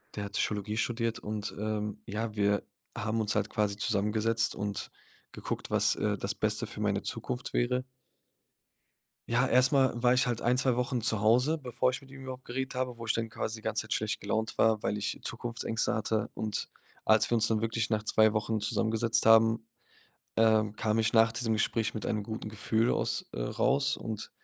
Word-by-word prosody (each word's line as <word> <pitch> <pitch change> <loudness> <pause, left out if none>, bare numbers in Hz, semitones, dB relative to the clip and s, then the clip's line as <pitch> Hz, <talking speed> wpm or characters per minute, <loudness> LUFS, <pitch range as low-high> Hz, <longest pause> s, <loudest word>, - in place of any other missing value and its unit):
der 105 - -3
hat 100 - -7
Psychologie 105 0 -1
studiert. 115 0 -1
Und, 105 -1 -4
ähm, 105 0 -3
ja, 110 +1 -3
wir 100 -1 +2 0.3
haben 110 +1 -1
uns 105 -1 -1
halt 105 0 0
quasi 105 -2 0
zusammengesetzt 110 +3 +1
und 100 0 -4 0.4
geguckt, - - -5
was, - - +3
äh, - - 0
das - - -2
Beste - - -1
für - - -8
meine - - 0
Zukunft 125 0 -4
wäre. 125 +1 +1 1.5
Ja, 125 +2 +3
erst 130 +2 +4
mal 135 -2 +4
war 125 0 +5
ich 125 - +3
halt 120 -2 -1
ein, 125 +1 +2
2 130 -1 +2
Wochen 125 -1 -1
zu 110 -2 +1
Hause, 125 +9 +3
bevor 125 -2 0
ich 125 - -4
mit 135 -1 -17
ihm 135 0 -11
überhaupt 130 -1 -8
geredet 130 +2 -3
habe, 125 -1 -2
wo 115 - -8
ich 110 - +1
dann 115 0 -2
quasi 110 0 -4
die 110 - -12
ganze 110 0 -1
Zeit 110 - -8
schlecht 110 -1 -1
gelaunt 110 +2 -2
war, 110 -1 +3
weil 105 - 0
ich 105 -1 -2
Zukunftsängste 115 -1 -2
hatte. 110 -1 -1
Und 110 -1 -3 0.3
als 110 0 +4
wir - - +3
uns 115 -1 +3
dann 110 -2 +1
wirklich 115 0 -1
nach 110 -1 +1
2 110 0 +4
Wochen 110 +1 0
zusammengesetzt 110 +1 +1
haben, 115 0 +5 0.7
ähm, 110 -2 +3
kam 110 0 0
ich 110 0 +2
nach 115 0 +5
diesem 115 0 -1
Gespräch 110 +1 0
mit 110 - -4
einem 105 - 0
guten 110 +1 -6
Gefühl 110 +2 +1
aus, - - -1
äh, - - -3
raus 65 +3 +1
und 110 -2 -5
110 Hz, 195 wpm, -30 LUFS, 105-120 Hz, 1.5 s, war